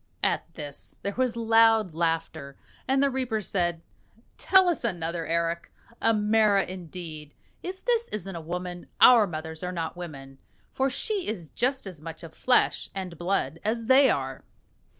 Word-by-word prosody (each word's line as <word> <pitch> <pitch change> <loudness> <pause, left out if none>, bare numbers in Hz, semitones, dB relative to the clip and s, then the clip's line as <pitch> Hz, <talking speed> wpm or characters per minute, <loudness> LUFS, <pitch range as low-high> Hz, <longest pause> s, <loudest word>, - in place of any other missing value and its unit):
At - - 0
this 145 -1 -7
there 200 - -2
was 255 -2 0
loud 225 -4 +4
laughter, 160 -4 -2 0.3
and 270 +1 +3
the 280 - +2
reapers 245 -6 -2
said, 175 -3 -1 0.5
"Tell 380 -1 +5
us 345 -6 0
another, 170 -6 -2
Eric. 170 +1 -1 0.3
A 225 - +4
mara 210 -1 +3
indeed! 165 -4 -8 0.3
If 375 +1 -7
this 470 -1 +2
isn't 195 -3 -5
a 170 - -5
woman, 175 +2 -5
our 230 -5 +8
mothers 160 -1 -6
are 180 - -2
not 165 -2 -4
women, 135 -6 -9 0.3
for 265 +1 +1
she 395 - -1
is 180 -8 -4
just 260 +1 0
as 180 -6 -9
much 165 +2 -8
of 160 -1 -10
flesh 250 -1 +2
and 185 -3 -5
blood 175 -1 -1
as 225 +2 -1
they 265 +2 +6
are." 135 - -2
185 Hz, 160 wpm, -27 LUFS, 165-230 Hz, 0.5 s, our